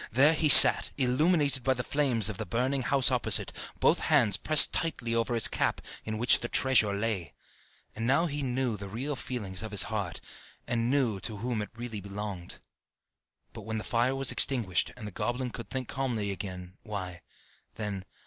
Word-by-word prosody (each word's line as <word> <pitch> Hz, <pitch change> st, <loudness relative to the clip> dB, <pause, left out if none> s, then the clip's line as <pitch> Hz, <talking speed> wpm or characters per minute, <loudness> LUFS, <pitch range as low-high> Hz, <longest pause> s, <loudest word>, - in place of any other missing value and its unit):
There 140 Hz, +7 st, +3 dB
he 155 Hz, -1 st, -1 dB
sat, -, -, +11 dB
illuminated 140 Hz, +1 st, 0 dB
by 130 Hz, 0 st, 0 dB
the 125 Hz, -, -5 dB
flames 125 Hz, -8 st, -1 dB
of 105 Hz, -3 st, -6 dB
the -, -, -4 dB
burning 130 Hz, +6 st, -2 dB
house 130 Hz, +1 st, +1 dB
opposite, -, -, +2 dB, 0.3 s
both -, -, +1 dB
hands 120 Hz, -10 st, +1 dB
pressed 155 Hz, +6 st, +5 dB
tightly 130 Hz, -8 st, -3 dB
over 115 Hz, +1 st, -2 dB
his 115 Hz, -, +5 dB
cap, -, -, -3 dB, 0.3 s
in 110 Hz, 0 st, -5 dB
which 120 Hz, +3 st, +3 dB
the 120 Hz, -, -6 dB
treasure 120 Hz, -5 st, +1 dB
lay; 100 Hz, -8 st, -4 dB, 0.6 s
and 115 Hz, +1 st, -5 dB
now 140 Hz, +6 st, +1 dB
he 145 Hz, -3 st, -5 dB
knew 130 Hz, -3 st, -3 dB
the 100 Hz, 0 st, -9 dB
real 135 Hz, +8 st, -5 dB
feelings 105 Hz, -8 st, -5 dB
of 110 Hz, -, -7 dB
his 105 Hz, -1 st, +3 dB
heart, 100 Hz, -5 st, -5 dB, 0.5 s
and 120 Hz, 0 st, -3 dB
knew 125 Hz, -7 st, -1 dB
to 110 Hz, +2 st, -7 dB
whom 115 Hz, 0 st, -4 dB
it 105 Hz, -, -7 dB
really 120 Hz, -3 st, -8 dB
belonged. 100 Hz, -2 st, -9 dB, 1.0 s
But 115 Hz, -, -10 dB
when 110 Hz, +1 st, -6 dB
the 110 Hz, -, -6 dB
fire 120 Hz, +3 st, -2 dB
was 135 Hz, -1 st, 0 dB
extinguished, 110 Hz, -10 st, 0 dB
and 115 Hz, -, -10 dB
the -, -, -9 dB
goblin 125 Hz, +5 st, -5 dB
could 115 Hz, -, -10 dB
think 130 Hz, -2 st, -6 dB
calmly 120 Hz, -7 st, -4 dB
again, 90 Hz, -2 st, -9 dB
why, 95 Hz, -5 st, -8 dB, 0.5 s
then.... 105 Hz, -3 st, -6 dB
115 Hz, 185 wpm, -27 LUFS, 105-130 Hz, 1.0 s, sat